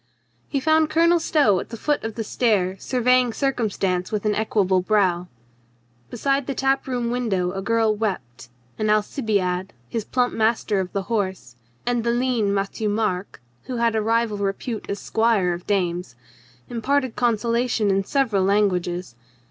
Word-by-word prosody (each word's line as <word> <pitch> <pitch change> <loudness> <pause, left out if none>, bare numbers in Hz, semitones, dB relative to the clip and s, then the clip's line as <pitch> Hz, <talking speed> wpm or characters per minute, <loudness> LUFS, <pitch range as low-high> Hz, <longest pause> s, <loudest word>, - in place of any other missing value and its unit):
He 280 - 0
found 315 +2 +3
Colonel 335 +2 +4
Stow 285 - +3
at - - -7
the 230 - -7
foot 295 +6 0
of 225 -1 -4
the 225 - -3
stair 205 -5 +1
sur 255 -2 -2
veying 250 -1 +4
circumstance 200 -9 -1
with 210 -1 -2
equable 205 -3 +1
brow. 180 -3 +1 0.8
Beside 275 +3 0
the 275 - -2
tap 270 0 +1
room 245 -2 -1
window 200 -8 0
a 195 +1 -4
girl 225 +1 +2
wept, 130 - -4 0.3
and 215 -1 0
Alcibiade, 205 -4 0 0.2
his 225 -2 -2
plump 245 +3 0
master 220 -2 +1
of 185 -1 -3
the 195 - -2
horse, 190 - -3 0.3
and 240 -1 0
the 235 - 0
lean 240 -4 +1
Matthieu 200 +2 -1
Marc 205 - -2 0.2
(who 255 - -4
had 230 -1 +1
a 220 - +2
rival 225 -1 +1
repute 200 +3 -3
as 200 - -2
squire 220 -5 +1
of 175 +1 -8
dames) 180 -8 -1 0.5
imparted 260 +2 0
consolation 235 -2 +1
in 195 0 +1
several 225 -5 +1
languages. 180 - 0
220 Hz, 155 wpm, -23 LUFS, 195-245 Hz, 0.8 s, Colonel